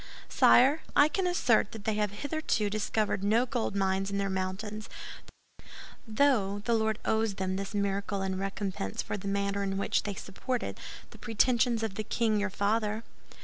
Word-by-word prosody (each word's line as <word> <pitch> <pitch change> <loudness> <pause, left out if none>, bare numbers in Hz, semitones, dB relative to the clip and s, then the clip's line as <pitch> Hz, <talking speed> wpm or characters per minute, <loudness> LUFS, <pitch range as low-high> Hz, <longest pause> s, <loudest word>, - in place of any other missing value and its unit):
"Sire, 275 +6 +5
I 290 - +7
can 375 +2 0
assert 245 - +2
that 220 -2 -9
they 220 - +1
have 210 0 0
hitherto 230 -2 -1
discovered 215 -1 -1
no 220 +5 +3
gold 235 -4 -2
mines 195 0 0
in 200 - -2
their 195 -1 -1
mountains; 195 +3 -4 1.2
though 215 -4 +2
the 235 - +2
Lord 220 -1 +1
owes 220 -2 +1
them 190 -1 -2
this 195 +2 -4
miracle 200 0 -1
in 190 -1 -2
recompense 195 - -3
for - - -4
the 200 -1 -6
manner 200 0 -1
in 195 -1 -1
which 200 - +1
they 205 -2 -4
supported 240 +6 -4 0.3
the - - -14
pretensions 235 0 +2
of 220 -3 -2
the 215 - -4
king 215 0 +1
your 205 0 0
father." 210 +2 0
210 Hz, 170 wpm, -29 LUFS, 195-225 Hz, 1.2 s, I